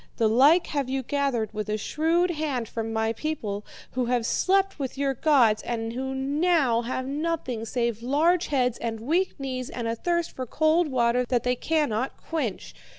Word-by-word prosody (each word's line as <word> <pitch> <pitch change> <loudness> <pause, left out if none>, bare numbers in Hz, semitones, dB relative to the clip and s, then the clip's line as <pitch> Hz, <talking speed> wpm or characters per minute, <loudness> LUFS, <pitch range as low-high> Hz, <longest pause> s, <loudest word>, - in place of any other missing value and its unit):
The 225 - +3
like 280 +10 +5
have 280 -4 -2
you 265 0 -1
gathered 255 -6 -1
with 215 0 -4
a 215 - 0
shrewd 330 - +1
hand 290 -7 -2
from 225 0 -4
my 220 0 0
people, 220 -7 -3 0.3
who 255 -1 -1
have 240 -1 0
slept 390 +5 +1
with 270 -1 -4
your 275 -1 +1
gods 245 -6 +3
and 225 -1 -3
who 265 +2 -3
now 280 -2 +2
have 255 +2 -3
nothing 280 -5 -2
save 235 -1 -1
large 320 +8 +2
heads, 250 -4 0
and 225 -1 -3
weak 325 +9 0
knees, 255 -2 -4
and 235 -2 -4
a 230 - -1
thirst 340 +6 -1
for 255 -1 -6
cold 315 +5 +2
water 245 -2 +2
that 245 -1 0
they 250 0 +1
cannot 270 -5 -1
quench. 285 - -4
260 Hz, 180 wpm, -26 LUFS, 230-310 Hz, 0.3 s, like